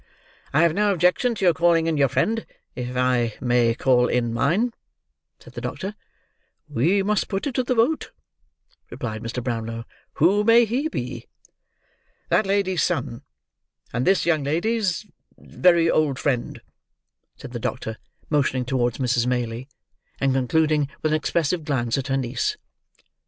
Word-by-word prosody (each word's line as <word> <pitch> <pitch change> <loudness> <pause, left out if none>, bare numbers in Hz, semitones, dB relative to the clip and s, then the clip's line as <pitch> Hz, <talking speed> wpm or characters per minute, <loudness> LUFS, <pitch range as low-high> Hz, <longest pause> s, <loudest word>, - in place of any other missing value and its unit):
"I 155 +4 +4
have 170 -2 +3
no 205 +2 +2
objection 185 +7 +2
to 195 - -1
your 175 - +5
calling 165 0 +3
in 165 -1 0
your 140 -2 +3
friend 220 - 0 0.3
if 125 +1 -4
I 125 -3 +1
may 120 -2 +2
call 125 -1 +3
in 120 -2 0
mine," 175 - +1 0.7
said - - -15
the - - -6
doctor. 195 +1 -4 0.7
"We 160 +9 +1
must 210 0 0
put 195 -1 -3
it 285 - -2
to 255 - 0
the 250 0 0
vote," 240 +8 +1 0.8
replied 110 -3 -5
Mr. 115 +1 -4
Brownlow, 115 -2 -3 0.3
"who 195 +7 +3
may 230 +2 +6
he 260 +8 -1
be?" - - -5 1.0
"That 215 - +2
lady's 195 -2 +1
son, 130 -7 -1 0.7
and 125 +2 -1
this 195 - +3
young 160 -4 +2
lady's—very 175 -1 0
old 150 -4 +1
friend," 125 -4 -2 0.8
said - - -10
the 120 - -5
doctor, 110 0 -4 0.3
motioning 135 -4 +1
towards 120 -2 0
Mrs. 120 -2 +1
Maylie, 120 0 -2 0.5
and 135 -1 +2
concluding 150 +3 +1
with 155 - +1
an - - +4
expressive 165 +2 -1
glance 125 -6 -1
at 135 - -4
her 135 0 0
niece. 135 - -2
150 Hz, 150 wpm, -23 LUFS, 125-190 Hz, 1.0 s, may